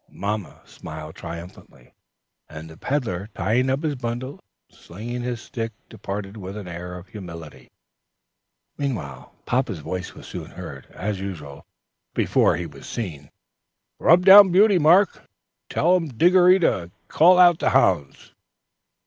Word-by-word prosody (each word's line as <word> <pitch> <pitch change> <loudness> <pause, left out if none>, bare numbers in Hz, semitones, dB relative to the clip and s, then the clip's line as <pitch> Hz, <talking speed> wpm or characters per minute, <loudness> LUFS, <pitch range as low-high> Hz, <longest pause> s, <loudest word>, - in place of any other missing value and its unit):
Mamma 105 -1 -5
smiled 80 0 -9
triumphantly, 85 +1 -11 0.6
and 80 +1 -10
the - - -12
peddler, 105 - -3
tying 115 +8 +1
up 135 +4 -1
his 155 -2 0
bundle 125 +1 -5 0.3
and - - -25
slinging 120 +7 -7
his 120 -1 -4
stick, 115 -4 -5 0.2
departed 100 -1 -6
with 95 0 -7
an 100 -3 -8
air 90 +1 -7
of 90 +1 -13
humility. 85 -6 -10 1.8
Papa's 125 -6 -1
voice 90 +4 -6
was - - -12
soon - - -8
heard, - - -10
as 100 +2 -5
usual, 80 -8 -8 0.5
before - - +2
he 85 - -4
was 80 - -12
seen. 80 -11 -6 0.7
"Rub 175 +2 +4
down 195 0 +10
Beauty, 195 +1 +5
Mark, 175 +6 +4
and - - -24 0.4
tell 180 +3 +2
Diggory 175 +5 +4
to 95 - 0 0.2
call 180 - +5
out 175 -2 +6
the - - +1
hounds." 70 -1 +1
110 Hz, 135 wpm, -23 LUFS, -, 1.8 s, down